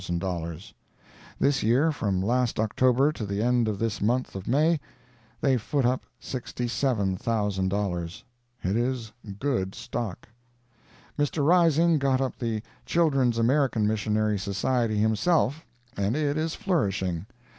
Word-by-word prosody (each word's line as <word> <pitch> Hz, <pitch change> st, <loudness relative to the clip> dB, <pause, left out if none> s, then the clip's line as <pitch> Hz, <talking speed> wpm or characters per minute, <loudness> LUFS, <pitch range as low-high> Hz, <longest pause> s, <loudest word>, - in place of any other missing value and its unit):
This 140 Hz, 0 st, +2 dB
year, 130 Hz, +9 st, +3 dB
from 100 Hz, -10 st, -1 dB
last 120 Hz, +2 st, +1 dB
October 130 Hz, +5 st, +3 dB
to 135 Hz, -, -6 dB
the 100 Hz, +1 st, -2 dB
end 120 Hz, -1 st, +2 dB
of 105 Hz, -2 st, -1 dB
this 110 Hz, -1 st, -2 dB
month 125 Hz, +5 st, 0 dB
of 95 Hz, -1 st, -6 dB
May, 155 Hz, +6 st, +3 dB, 0.6 s
they 135 Hz, -2 st, +3 dB
foot 130 Hz, +4 st, -1 dB
up 125 Hz, +1 st, 0 dB
$67,000. 100 Hz, -7 st, -1 dB, 0.4 s
It 95 Hz, +3 st, 0 dB
is 120 Hz, -2 st, -1 dB, 0.3 s
good 110 Hz, -8 st, -1 dB
stock. 115 Hz, -7 st, -5 dB, 0.9 s
Mr. 145 Hz, 0 st, +1 dB
Rising 165 Hz, -1 st, +4 dB
got 135 Hz, -1 st, +2 dB
up 135 Hz, -1 st, -2 dB
the 115 Hz, -3 st, -2 dB, 0.2 s
Children's 135 Hz, -8 st, +2 dB
American 120 Hz, -2 st, +2 dB
Missionary 105 Hz, 0 st, +1 dB
Society 110 Hz, +3 st, 0 dB
himself, 130 Hz, -, +1 dB, 0.3 s
and 100 Hz, +4 st, 0 dB
it 145 Hz, -1 st, 0 dB
is 160 Hz, +1 st, -1 dB
flourishing. 95 Hz, -, -1 dB
120 Hz, 120 wpm, -26 LUFS, 105-140 Hz, 0.9 s, Rising